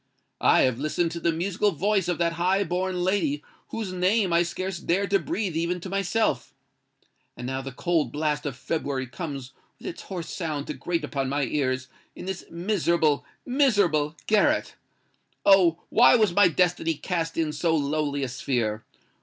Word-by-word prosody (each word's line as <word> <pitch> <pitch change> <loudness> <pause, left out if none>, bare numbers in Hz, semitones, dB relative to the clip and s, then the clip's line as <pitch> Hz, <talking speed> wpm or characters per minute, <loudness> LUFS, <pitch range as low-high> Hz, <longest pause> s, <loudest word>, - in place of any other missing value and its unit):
I - - +5
have 130 -2 +2
listened 160 +3 0
to 170 - -5
the 170 0 +1
musical 185 +5 0
voice 195 +2 +1
of 175 -2 0
that 170 -1 +1
high 185 +4 +2
born 180 0 -1
lady 165 -7 0 0.2
whose 215 -5 -4
name 185 +1 +2
I 170 - +5
scarcely 185 +1 -4
dare 190 +4 +2
to 195 0 +2
breathe 215 - -3
even 170 +2 -1
to 185 - -7
myself—and 195 - -4
now 130 +1 -2
the 135 0 -6
cold 155 -1 0
blast 150 0 -1
of 135 - -4
February 135 -1 -2
comes 135 -2 -6 0.2
with - - -15
its - - -5
hoarse 175 -4 -6
sound 155 -5 -3
to - - -4
grate 170 -1 -2
upon 135 -2 -2
my 145 +1 0
ears 130 -1 -1 0.3
in - - -8
this 190 -1 -5
miserable—miserable 170 - +1
garret! 295 +9 +2 0.7
Oh! 180 -4 +5
why 245 +2 +6
was 215 -6 +3
my 205 0 +6
destiny 170 -2 +1
cast 165 +1 -3
in 160 -2 0
so 160 +2 +1
lowly 145 -1 -1
a - - -1
sphere? 120 -4 -2
170 Hz, 165 wpm, -26 LUFS, 145-190 Hz, 0.7 s, why